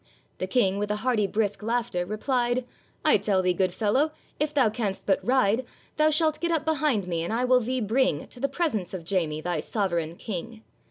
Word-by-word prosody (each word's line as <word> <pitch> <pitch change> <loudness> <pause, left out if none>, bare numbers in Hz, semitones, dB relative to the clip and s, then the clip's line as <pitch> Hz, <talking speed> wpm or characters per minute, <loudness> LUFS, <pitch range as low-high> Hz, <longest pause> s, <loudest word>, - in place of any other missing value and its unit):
The 185 - -2
King, 195 -2 +2
with 205 0 -2
a 210 - +1
hearty 225 -6 +2
brisk 210 0 -1
laughter, 225 -5 -1
replied, 240 +3 0 0.4
'I - - +6
tell 190 -3 +1
thee, 180 0 +3
good 185 0 +1
fellow, 230 - +1 0.3
if 300 0 0
thou 275 -6 +3
canst 210 -4 -3
but 195 - +1
ride, 250 -2 +2 0.3
Thou 305 0 +5
shalt 310 0 +2
get 340 - -1
up 320 -2 0
behind 300 - +1
me, 170 -2 -1
and 170 - -3
I 240 +3 +1
will 255 0 +5
thee 250 +2 -2
bring 220 - +1
To 250 - -11
the 275 +2 0
presence 220 - -1
of 170 -3 -7
Jamie, 165 -5 -1
thy 175 -1 -1
sovereign 170 -3 -1
King. 220 +4 -6
220 Hz, 205 wpm, -26 LUFS, 190-255 Hz, 0.4 s, I